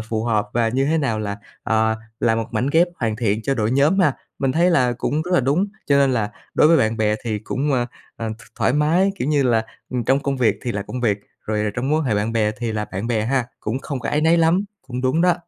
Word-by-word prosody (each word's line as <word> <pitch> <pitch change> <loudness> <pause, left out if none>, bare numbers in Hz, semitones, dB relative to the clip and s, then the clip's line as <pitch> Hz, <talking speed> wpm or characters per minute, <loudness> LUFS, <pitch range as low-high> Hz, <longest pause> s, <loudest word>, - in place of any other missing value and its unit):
phù 110 0 -3
hợp 105 -3 +1
và 115 -1 +2
như 130 +4 +1
thế 160 +3 +1
nào 120 -7 0
là, 100 -1 -3 0.3
ờ, 110 0 +2 0.3
là 115 - +3
một 115 -1 -2
mảnh 125 - -1
ghép 170 +2 +4
hoàn 110 -3 0
thiện 110 -1 0
cho 135 - 0
đội 110 -3 0
nhóm 145 +9 +3
ha. 150 -7 +4 0.3
Mình 135 -1 +1
thấy 175 +4 +3
là 125 -7 +3
cũng 145 +5 -1
rất 180 - -7
là - - +5
đúng, 145 +10 +1 0.2
cho 140 - +4
nên 135 -2 +4
là 110 -3 0 0.2
đối 150 - +5
với 165 - +6
bạn 110 -5 +1
bè 105 -1 +2
thì 110 -2 -1
cũng, 135 +7 -2
à, 120 -2 +1 0.3
à, 115 - -4
th - - -15 0.2
thoải - - +2
mái, 165 +7 +2
kiểu 130 - -1
như 145 -2 +3
là, 115 -3 +2 0.3
ừm, 125 -2 -2
trong 135 +4 +3
công 140 -1 -1
việc 125 -3 +2
thì 120 - -2
là 100 - -2
công 125 - -6
việc, 105 -4 +1 0.3
rồi 105 -1 0
trong 125 +2 -2
mối 155 - +3
quan - - -2
hệ 110 - +1
bạn 105 +3 0
bè 110 -2 +2
thì 115 -2 -2
là 105 -1 -2
bạn 95 +4 -3
bè 110 -3 0
ha, 130 0 +1 0.2
cũng 110 +4 -2
không 135 -1 -5
có - - -4
áy 150 - +1
náy 165 +2 +4
lắm. 165 +4 +3 0.2
Cũng 125 -1 -5
đúng 130 +6 +1
đó. 180 -1 +4
125 Hz, 275 wpm, -21 LUFS, 110-145 Hz, 0.3 s, với